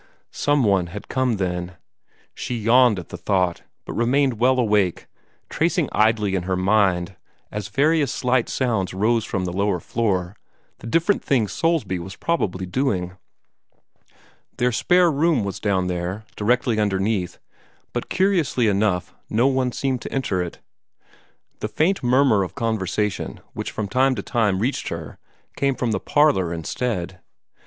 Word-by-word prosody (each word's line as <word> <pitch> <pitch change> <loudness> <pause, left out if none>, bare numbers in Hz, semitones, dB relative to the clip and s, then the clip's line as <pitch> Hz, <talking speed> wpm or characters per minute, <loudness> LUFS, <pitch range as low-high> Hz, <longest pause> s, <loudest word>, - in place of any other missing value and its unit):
Somebody 105 -12 +2
had 100 +4 -9
come, 130 -3 +1
then. 90 -2 -3 0.6
She 125 - -4
yawned 115 0 +4
at 90 - -7
the 90 - -8
thought, 90 -1 0 0.2
but - - -6
remained 125 0 +1
well 130 +2 +4
awake, 105 -7 +1 0.4
tracing - - 0
idly 110 -2 +2
in 95 - 0
her 95 +1 -1
mind, 95 -2 +2 0.4
as 105 -2 -4
various 145 +5 +2
slight 125 -1 +1
sounds 110 -8 -1
rose 110 +3 +1
from 95 -3 -2
the 90 - -3
lower 100 -1 0
floor, 95 -3 -1 0.4
the 115 - -9
different 165 - +1
things 115 -8 +1
Soulsby 165 - 0
was 95 +3 -8
probably 95 - -1
doing. 90 -4 -1 1.4
Their 125 0 +2
spare 175 +8 +3
room 150 -4 +2
was 100 -1 -4
down 95 -3 +1
there, 90 +4 -3
directly 120 +1 +1
underneath, 100 -2 0 0.6
but - - -3
curiously 180 - +2
enough 100 -3 0 0.2
no 115 +4 +2
one 130 -2 +2
seemed 130 0 -2
to - - -7
enter 105 -9 -1
it. 85 -1 -6 1.0
The - - -2
faint 185 +5 +1
murmur 125 -4 +3
of 95 - -4
conversation 105 -2 -2
which - - -4
from 105 - -4
time 130 +5 +2
to 100 - -4
time 105 -5 +1
reached 130 +5 -1
her 85 -2 -6 0.4
came 140 -1 +1
from 120 -1 -1
the - - 0
parlor 145 - +2
instead. 90 +2 -3
110 Hz, 145 wpm, -22 LUFS, 95-130 Hz, 1.4 s, yawned